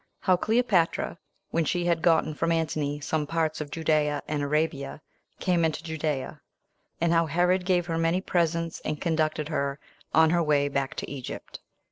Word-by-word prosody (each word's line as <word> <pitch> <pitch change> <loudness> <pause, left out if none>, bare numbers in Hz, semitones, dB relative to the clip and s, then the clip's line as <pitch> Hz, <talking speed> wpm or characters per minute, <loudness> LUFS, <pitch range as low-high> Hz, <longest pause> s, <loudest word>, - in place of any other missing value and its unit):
How 185 - +4
Cleopatra, 205 -5 +1 0.3
When 165 - +2
She 175 +3 0
Had 170 -2 +1
Gotten 160 -1 +3
From 165 +2 0
Antony 155 -3 -1
Some 150 0 -1
Parts 160 -1 -1
Of 150 - -5
Judea 150 -2 +1
And 150 -1 -1
Arabia 145 -1 -1 0.4
Came 180 -3 +2
Into 160 0 0
Judea; 155 -4 -3 0.6
And 170 0 +2
How 165 -1 +3
Herod 180 +3 +2
Gave 180 -2 +2
Her 165 -1 -2
Many 165 +2 +2
Presents 170 -3 0
And 150 - -3
Conducted 155 -2 0
Her 140 -2 -1 0.3
On 160 0 +5
Her 175 0 +3
Way 145 -3 +2
Back 140 -1 -2
To - - -4
Egypt. 135 -3 -7
160 Hz, 165 wpm, -27 LUFS, 150-170 Hz, 0.6 s, On